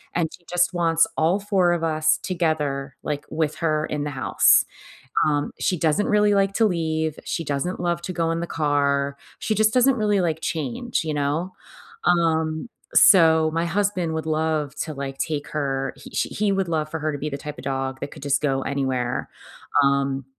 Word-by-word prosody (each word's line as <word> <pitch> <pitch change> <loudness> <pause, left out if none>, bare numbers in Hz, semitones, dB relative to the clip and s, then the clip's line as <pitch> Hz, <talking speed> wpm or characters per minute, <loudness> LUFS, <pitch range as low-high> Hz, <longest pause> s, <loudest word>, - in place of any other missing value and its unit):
and 165 -2 +1
she 175 - -15
just 180 +1 +2
wants 165 -1 +3
all 165 +5 +3
4 190 -4 +2
of 170 - -2
us 155 -1 +2
together, 150 -7 -1
like, 145 -1 -3
with 155 -1 -1
her 155 -2 0
in 145 -1 -3
the 145 - -3
house. 130 -2 +4 0.7
Um, 145 -1 0
she 180 - 0
doesn't 165 +6 +1
really 210 -1 +3
like 195 0 +2
to 225 - +3
leave, 160 -4 -1
she 165 - -3
doesn't 145 +6 -2
love 170 -1 -1
to 185 - -3
go 165 -1 0
in 165 - -2
the 170 - -3
car. 140 -2 0 0.2
She 215 - 0
just 215 +1 +3
doesn't 255 +1 +4
really 210 -3 +1
like 160 -2 -1
change, 165 - -2
you 155 - -2
know? 150 +6 -1 0.5
Um, 160 +1 +1 0.3
so 160 -4 +6
my 165 - +1
husband 185 -2 0
would 160 0 -3
love 155 -2 -1
to, 155 - -6
like, 135 -1 -5
take 150 -2 -2
her 135 -3 -2
he - - -12
she - - 0
he 210 -1 0
would 195 -2 0
love 155 -2 -1
for 160 - -3
her 155 +1 -1
to - - -3
be 150 +1 -3
the 140 - -4
type 150 0 -7
of - - -9
dog 135 -1 -3
that - - -5
could - - -12
just 140 +1 +1
go 135 -2 0
anywhere. 130 -3 -2 0.5
Um, 140 -1 +1
160 Hz, 195 wpm, -23 LUFS, 145-175 Hz, 0.7 s, so